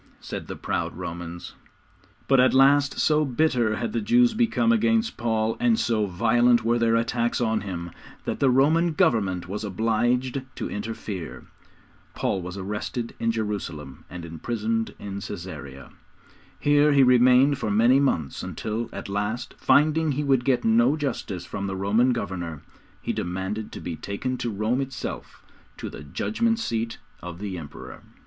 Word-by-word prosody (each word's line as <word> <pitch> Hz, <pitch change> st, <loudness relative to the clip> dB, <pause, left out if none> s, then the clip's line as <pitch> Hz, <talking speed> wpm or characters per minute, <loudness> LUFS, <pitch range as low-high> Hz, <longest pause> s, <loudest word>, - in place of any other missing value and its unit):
said -, -, -7 dB
the -, -, -5 dB
proud -, -, -3 dB
Romans. 85 Hz, 0 st, -6 dB, 0.7 s
But 135 Hz, -1 st, +4 dB
at 130 Hz, +1 st, +4 dB
last 140 Hz, +1 st, +5 dB
so 155 Hz, 0 st, +3 dB
bitter 125 Hz, -5 st, +1 dB
had 225 Hz, -, -3 dB
the -, -, 0 dB
Jews 240 Hz, +2 st, +4 dB
become 230 Hz, 0 st, +2 dB
against 225 Hz, 0 st, +2 dB
Paul, 110 Hz, -1 st, 0 dB
and 235 Hz, -2 st, +3 dB
so 110 Hz, -3 st, +1 dB
violent 120 Hz, +5 st, +3 dB
were 120 Hz, +1 st, +2 dB
their 115 Hz, -1 st, +3 dB
attacks 120 Hz, +1 st, 0 dB
on 110 Hz, -3 st, +1 dB
him, 85 Hz, -4 st, -5 dB, 0.3 s
that -, -, -3 dB
the 135 Hz, -, +4 dB
Roman 155 Hz, +6 st, +3 dB
Government 95 Hz, -, +1 dB
was 105 Hz, +3 st, -4 dB
obliged 120 Hz, +5 st, 0 dB
to -, -, -4 dB
interfere. 105 Hz, -4 st, -6 dB, 0.7 s
Paul 95 Hz, -, -1 dB
was 90 Hz, +2 st, -7 dB
arrested 105 Hz, +4 st, -4 dB
in 115 Hz, -, +1 dB
Jerusalem 100 Hz, -11 st, -4 dB
and 90 Hz, -1 st, -7 dB
imprisoned 110 Hz, +7 st, -2 dB
in 100 Hz, -1 st, -6 dB
Caesarea. 85 Hz, -9 st, -8 dB, 0.7 s
Here 145 Hz, 0 st, +4 dB
he 140 Hz, -1 st, +6 dB
remained 125 Hz, +2 st, +5 dB
for 110 Hz, -, -2 dB
many 115 Hz, +6 st, +4 dB
months, 85 Hz, -, 0 dB
until, 115 Hz, +2 st, -4 dB
at -, -, -7 dB
last, 105 Hz, +4 st, -3 dB
finding 155 Hz, +1 st, +3 dB
he 145 Hz, +3 st, -1 dB
would 135 Hz, -3 st, +2 dB
get 130 Hz, -, +2 dB
no 225 Hz, -4 st, +4 dB
justice 110 Hz, -, -3 dB
from 100 Hz, 0 st, -4 dB
the 95 Hz, -, -3 dB
Roman 105 Hz, +6 st, +2 dB
governor, 90 Hz, -, -4 dB, 0.4 s
he -, -, -1 dB
demanded 95 Hz, +4 st, -3 dB
to -, -, -6 dB
be 85 Hz, -, -5 dB
taken 100 Hz, +9 st, -3 dB
to 120 Hz, -, -2 dB
Rome 110 Hz, +5 st, 0 dB
itself 135 Hz, -1 st, -6 dB, 0.3 s
to -, -, -6 dB
the -, -, -9 dB
Judgment 225 Hz, -, 0 dB
Seat 115 Hz, -, -2 dB, 0.2 s
of 90 Hz, -1 st, -7 dB
the 100 Hz, 0 st, -5 dB
Emperor. 75 Hz, -3 st, -10 dB
115 Hz, 155 wpm, -25 LUFS, 100-135 Hz, 0.7 s, he